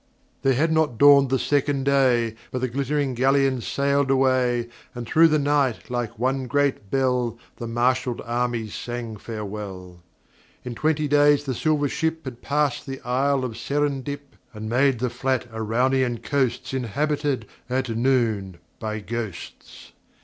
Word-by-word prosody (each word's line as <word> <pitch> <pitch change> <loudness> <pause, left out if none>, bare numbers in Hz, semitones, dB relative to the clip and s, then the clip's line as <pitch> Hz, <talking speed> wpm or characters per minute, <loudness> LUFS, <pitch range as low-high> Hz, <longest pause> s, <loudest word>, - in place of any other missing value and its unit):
There 135 -1 +3
had 160 +5 +2
not 160 -7 +1
dawned 140 0 +7
the 130 - +2
second 145 0 0
day 130 -5 +3 0.2
But 130 - -4
the 130 - +1
glittering 140 +2 -1
galleon 135 0 +2
sailed 140 +2 0
away, 130 -3 +2 0.3
And 120 -1 -5
through 160 +8 +5
the 155 -1 +2
night 140 -4 0
like 120 -2 -3
one 130 +2 -1
great 140 -7 0
bell 125 -3 0 0.2
The 120 - -5
marshalled 125 +1 0
armies 120 -2 -2
sang 120 -2 -5
farewell. 100 -5 -7 0.6
In 125 - -4
twenty 155 +4 0
days 145 0 +4
the 135 -2 -2
silver 150 +3 +1
ship 160 +2 -2
Had 125 -2 -7
passed 145 -2 0
the 135 0 -5
Isle 130 +2 +1
of 115 -3 -5
Serendip, 145 -1 -2 0.2
And 110 0 -6
made 130 +3 +2
the 125 +1 -2
flat 130 -2 -1
Araunian 120 +2 0
coasts 130 -3 -1
Inhabited, 140 +1 -1 0.2
at 130 0 -1
noon, 115 -6 0 0.2
by 110 -1 -4
Ghosts. 110 -5 -7
130 Hz, 145 wpm, -24 LUFS, 120-140 Hz, 0.6 s, dawned